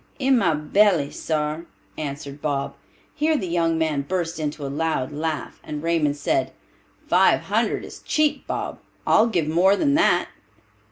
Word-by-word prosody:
"In 270 -1 +3
my 170 -7 +2
belly, 155 -1 +2
sar," 155 +1 -2 0.3
answered 145 -1 -6
Bob. 140 -2 -2 0.4
Here 310 +1 +1
the 190 - -3
young 165 -1 +1
men 155 -3 0
burst 170 +2 -3
into 150 -1 -3
a - - -2
loud 150 -1 -1
laugh, 155 -1 -4
and 150 0 -6
Raymond 160 -4 +1
said, 325 - 0 0.5
"Five - - +4
hundred - - -1
is - - -10
cheap, 305 -1 0
Bob; - - -4 0.3
I'll 220 - +5
give 175 -9 0
more 180 +5 +4
than 280 +7 +1
that." 315 +2 +3
160 Hz, 155 wpm, -23 LUFS, 150-190 Hz, 0.5 s, I'll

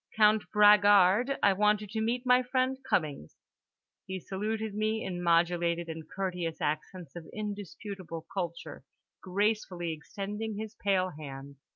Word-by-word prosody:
"Count 215 0 +4
Bragard, 205 +3 +6
I 200 - +6
want 210 +2 +3
you 210 - -7
to 220 +2 -4
meet 240 +3 -1
my 250 0 +5
friend 255 +1 0
Cummings"—he 155 - -5
saluted 215 +3 -3
me 215 +1 -1
in 175 -2 -4
modulated 170 0 +2
and 160 -1 -7
courteous 180 -4 -3
accents 155 +1 -4
of 170 -2 -8
indisputable 200 -4 -6
culture, 170 -6 -5 0.4
gracefully 185 -3 -1
extending 205 +7 -5
his 220 0 -5
pale 190 -2 +1
hand. 140 -2 -9
195 Hz, 130 wpm, -30 LUFS, 170-215 Hz, 0.4 s, Bragard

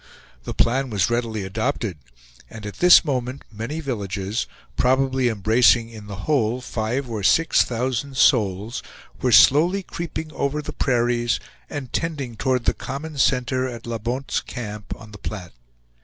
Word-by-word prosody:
The - - -5
plan 130 +3 +2
was 105 -1 +1
readily 115 -3 -1
adopted 110 - -2 0.5
and 110 -2 -9
at 105 -2 -7
this 180 -1 +7
moment 130 -2 -2
many 115 +9 -5
villages, 105 - -3 0.3
probably 130 - +2
embracing 115 +2 +3
in 110 -2 -10
the 100 -2 -7
whole 125 -5 +1
five 125 +2 -2
or 110 -3 -4
six 165 +11 +4
thousand 130 +3 -2
souls, 110 -4 +2 0.4
were 125 - +2
slowly 170 - +6
creeping 160 -3 -6
over 140 +2 -1
the - - -6
prairies 120 -2 +1 0.3
and 140 -4 -6
tending 145 -8 -2
towards 125 +1 0
the - - +3
common 145 +2 -6
center 130 0 +2
at 120 -2 -8
La 115 -1 -3
Bonte's 125 +5 -2
Camp, 105 -3 -7
on 110 +1 -13
the 105 - -11
Platte. 95 -5 -6
120 Hz, 150 wpm, -23 LUFS, 110-135 Hz, 0.5 s, this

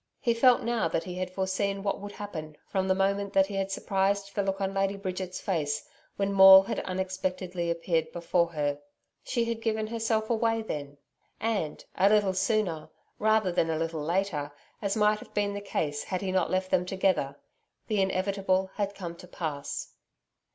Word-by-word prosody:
He 235 - +2
felt 245 +1 +5
now 235 -1 +1
that 165 - -1
he 180 0 -6
had 185 0 -2
foreseen 195 +1 -1
what 200 -1 -1
would 205 0 -8
happen, 155 -7 -7
from 190 -1 -1
the 190 - +3
moment 200 +1 0
that 195 0 +5
he 200 - -8
had 195 0 -1
surprised 195 +1 0
the 205 - +1
look 195 0 -1
on 195 0 -1
Lady 195 0 0
Bridget's 185 -1 -4
face, 150 -6 -1 0.3
when 200 0 0
Maule 190 0 +10
had - - -3
unexpectedly 185 -1 -3
appeared 165 -1 0
before 170 0 +1
her. 145 -2 -1 0.4
She 235 -2 0
had 230 -1 -3
given 220 -1 0
herself 220 -1 -1
away 225 0 +1
then. 145 -7 -5 0.4
And, 215 -9 -2
a 195 - +4
little 205 -2 +3
sooner, 185 -5 0 0.3
rather 215 -3 +3
than 165 -1 +1
a 160 - 0
little 165 -1 -2
later 165 -3 -1 0.3
as 200 0 -1
might 210 0 +3
have - - -14
been 205 -1 +1
the 205 - -4
case 145 -7 -2
had 185 -2 -2
he 190 -2 -2
not 185 -2 +1
left 185 0 -1
them 185 -1 +3
together 185 -7 0 0.5
the 210 -3 +1
inevitable 190 0 0
had 200 -1 -1
come 170 -3 -6
to 180 - -12
pass. 155 -5 -5
190 Hz, 185 wpm, -28 LUFS, 180-205 Hz, 0.5 s, Maule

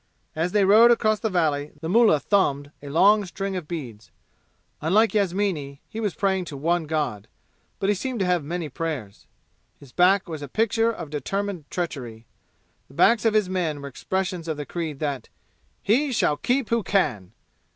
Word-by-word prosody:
As 165 +3 -1
they 205 -1 +3
rode 220 +5 +7
across 215 -3 +3
the 220 - -1
valley 150 -5 0
the 160 - -5
mullah 215 -4 +4
thumbed 145 -7 +1
a 145 - -8
long 200 +8 +5
string 195 +1 -4
of 175 -5 -5
beads. 125 -11 -7 0.7
Unlike 210 +9 +3
Yasmini, 185 -8 -1
he 220 - -7
was 210 -5 -2
praying 190 -2 0
to 145 -4 -7
one 165 +3 0
god; 145 -10 -2 0.5
but 195 - -2
he 205 - +4
seemed 245 +4 -4
to - - +2
have 180 -3 +1
many 170 +2 -4
prayers. 145 -9 -5 0.5
His 140 -3 -15
back 190 +4 +3
was 160 -3 -6
a 145 - -6
picture 225 - +1
of 165 -9 -8
determined 180 +3 -3
treachery 125 -10 -5 0.6
the 135 - -18
backs 230 +6 +4
of 220 -1 +3
his 210 -3 +3
men 175 -5 -2
were 140 - -7
expressions 180 +4 -3
of 160 -2 -2
the 145 - -5
creed 160 -4 -4
that 145 -3 -3 0.5
"He 265 +8 +2
shall 185 -10 +2
keep 250 - -1
who 230 0 +2
can!" 105 - -1
175 Hz, 180 wpm, -24 LUFS, 145-205 Hz, 0.7 s, rode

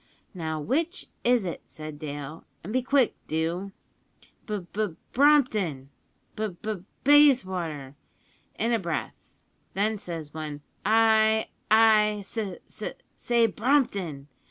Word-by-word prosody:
`Now, 160 -3 -3
which 315 - -1
is 240 -4 +3
it?' 170 - -4
said 155 -1 -8
Dale, 145 +1 -6 0.2
`an' 205 - -5
be 255 +3 +1
quick 265 -1 +3
do.' 170 +5 -2 0.8
"`B 210 -4 -3
B 215 +1 0
B 165 - -12 0.2
Brompton!' 215 - +3 0.4
"`B 215 -5 -3
B 215 - -2
B 185 -4 -10 0.2
Bayswater!' 185 - +3 0.6
in 230 +2 +1
a 230 - +2
breath; 170 -4 -5 0.4
then 210 +2 +1
says 165 -5 -6
one, 150 -2 -6 0.2
`I 220 0 +4 0.2
I 215 -1 +5
s 195 - -11
s 205 -5 -6 0.3
say 235 -1 +2
Brompton!' 200 - 0
205 Hz, 125 wpm, -27 LUFS, 160-230 Hz, 0.8 s, I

